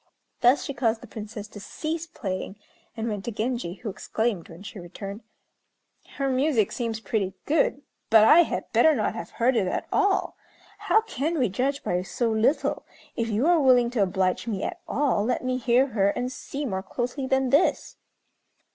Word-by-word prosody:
Thus 250 +4 +4
she 280 - -4
caused 230 -4 0
the - - -10
Princess 210 -1 -7
to 205 - -10
cease 315 +10 -4
playing, 190 - -5 0.4
and 225 +1 -2
went 205 -3 -3
to 235 - -2
Genji, 225 -4 -2
who 220 +1 -6
exclaimed, 220 -2 -2
when 170 +3 -11
she 210 -1 -8
returned, 195 +4 -8 1.0
"Her 275 -1 0
music 260 -4 +2
seems 230 -2 -3
pretty 200 -4 -2
good; 290 -2 +1 0.3
but 220 -1 +7
I 305 +9 +8
had - - -3
better 315 -1 +5
not 215 - 0
have 170 - -6
heard 245 +2 +1
it 195 -5 +2
at - - -2
all. 400 -2 +1 0.4
How 435 - +3
can 325 - -2
we 250 -6 +2
judge 270 +8 -1
by 180 0 0
so 230 +5 -1
little? 230 +7 +1 0.3
If 230 0 -1
you 220 +5 +1
are 345 0 +5
willing 250 -4 +4
to 240 -4 0
oblige 190 +2 0
me 205 -4 -2
at - - -4
all, 270 -7 +1
let 250 +3 -1
me 255 0 0
hear 250 +1 +2 0.2
and 250 +1 -2
see 275 +2 -5
more 190 -7 -2
closely 250 +6 -3
than 265 -1 +1
this." 285 +6 +2
235 Hz, 180 wpm, -26 LUFS, 210-270 Hz, 1.0 s, I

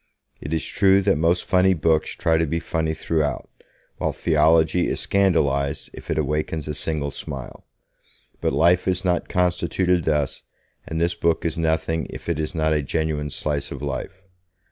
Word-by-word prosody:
It 70 - -6
is 80 -1 -1
true 100 0 +3
that 95 -5 +2
most 85 +2 +2
funny 95 0 +3
books 80 -1 +1
try 80 -1 +2
to 80 - +1
be 85 +3 -1
funny 80 -1 -2
throughout, 80 -2 -1 0.5
while - - 0
theology 80 +2 +3
is - - -2
scandalized 70 -8 +1
if - - -12
it 80 - 0
awakens 75 +1 -1
a 75 - -2
single 75 -1 -2
smile. 65 -2 -8 0.7
But - - +1
life 85 +3 +3
is 95 0 0
not 90 -1 0
constituted 90 0 +1
thus, 75 -3 0 0.5
and 80 - -3
this 85 +1 +1
book 85 0 0
is 80 - 0
nothing 80 0 0
if - - -8
it 85 -3 -1
is 75 +1 -3
not 80 -1 +1
a 75 - +1
genuine 75 0 -2
slice 75 0 -3
of 70 0 -7
life. 75 +8 -5
80 Hz, 170 wpm, -23 LUFS, 75-85 Hz, 0.7 s, true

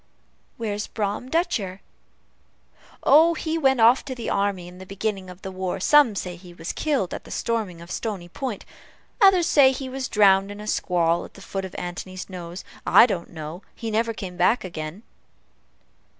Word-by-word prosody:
"Where's 210 -2 -3
Brom 210 +3 -3
Dutcher?" 215 - -1 1.2
"Oh, 320 +4 +6
he 320 0 -2
went 265 -4 +3
off 235 +3 +6
to 260 - -5
the 240 - -4
army 200 -3 0
in 180 +1 -12
the 190 - -9
beginning 195 -1 -3
of 180 +2 -12
the 190 - -5
war; 185 0 -3
some 280 +1 +5
say 180 -2 -4
he 175 -1 -14
was 165 -1 -5
killed 280 - -1
at - - -6
the - - -14
storming 215 -7 -2
of 170 - -11
Stony 200 -6 -4
Point 235 +4 -5 0.6
others 380 -4 +6
say 280 -5 +6
he 265 0 -5
was 265 0 -4
drowned 195 -2 +4
in 205 0 -8
a 210 - -7
squall 175 -4 +1
at - - -13
the - - -12
foot 195 0 -4
of 185 - -9
Antony's 185 +2 -6
Nose. 175 0 -7 0.2
I - - +7
don't 185 -8 -3
know 160 +2 -7
he 225 -2 -5
never 230 +2 +1
came 190 -5 -7
back 215 +6 +3
again." 170 +2 -6
200 Hz, 180 wpm, -24 LUFS, 180-240 Hz, 1.2 s, I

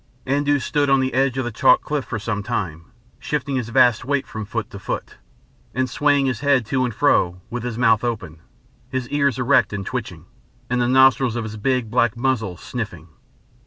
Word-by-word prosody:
Andoo 145 +2 +2
stood 145 +1 0
on 135 0 +4
the 130 0 -1
edge 130 0 +1
of 130 - -1
the 120 - -3
chalk 115 - +4
cliff 150 -3 -2
for 115 - -4
some 105 0 -3
time, 85 -5 -4 0.3
shifting 150 -2 -2
his 120 -3 -3
vast 120 -1 +4
weight 140 +1 -1
from 110 -1 -6
foot 115 +1 -4
to 100 - -8
foot, - - -5 0.6
and 130 0 +1
swaying 145 +2 +2
his 130 -4 -1
head 140 -4 +2
to 130 +2 0
and 125 - -1
fro, 90 -11 +2
with 120 0 -3
his 120 -1 -4
mouth 115 -3 +3
open, 90 -10 -4 0.5
his 130 -1 -3
ears 140 -2 +1
erect 130 +1 +3
and 100 -1 -4
twitching, 100 -10 -5 0.5
and 125 0 +1
the 120 - +2
nostrils 130 -1 +4
of 120 - -2
his 110 0 -6
big, 120 0 -1
black 120 -1 +2
muzzle 115 -8 -1
sniffing. 90 -8 -6
125 Hz, 200 wpm, -21 LUFS, 110-135 Hz, 0.6 s, on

